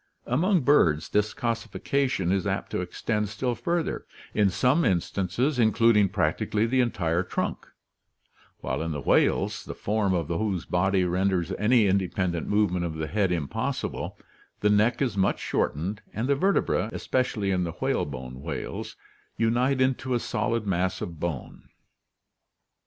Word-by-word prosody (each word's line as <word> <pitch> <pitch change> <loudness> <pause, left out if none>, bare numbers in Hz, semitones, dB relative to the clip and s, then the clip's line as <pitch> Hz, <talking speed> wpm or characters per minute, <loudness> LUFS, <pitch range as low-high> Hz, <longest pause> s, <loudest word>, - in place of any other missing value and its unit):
Among 170 - +2
birds 85 - +3
this 105 +1 +1
coossification 115 -3 -1
is 95 +1 0
apt 95 0 -2
to - - -1
extend 105 +4 -2
still 120 +4 -1
further, 170 +6 -2 0.3
in 105 -2 +3
some 125 - +2
instances 95 - 0
including 110 -2 +4
practically 105 +4 0
the 130 +3 +2
entire 85 -8 0
trunk, - - -3 0.9
while - - -2
in 80 0 -2
the 75 - -3
whales, - - +2
the - - -7
form 100 -2 0
of 85 -4 -1
whose 90 +1 -1
body 95 +1 +2
renders 90 0 0
any 110 +4 +3
independent 95 -3 0
move 105 -2 +2
ment 90 -1 -1
of 85 -2 -3
the 80 0 -3
head 95 +4 0
impossible, 80 -6 -3 0.4
the 105 - +3
neck 110 +6 +3
is 120 -6 -1
much 95 - +2
shortened 95 +8 -2
and 115 +4 -2
the 140 - +4
vertebrae, 140 - +1
especially 115 -6 -1
in 90 -1 +1
the 85 -2 -3
whale - - 0
bone 65 -2 -7
whales, - - -5 0.4
unite 125 +4 +2
into 130 -1 +1
a - - +1
solid 115 -1 -1
mass 95 -1 0
of 85 -3 -6
bone. 85 -7 -5
100 Hz, 150 wpm, -26 LUFS, 90-120 Hz, 0.9 s, including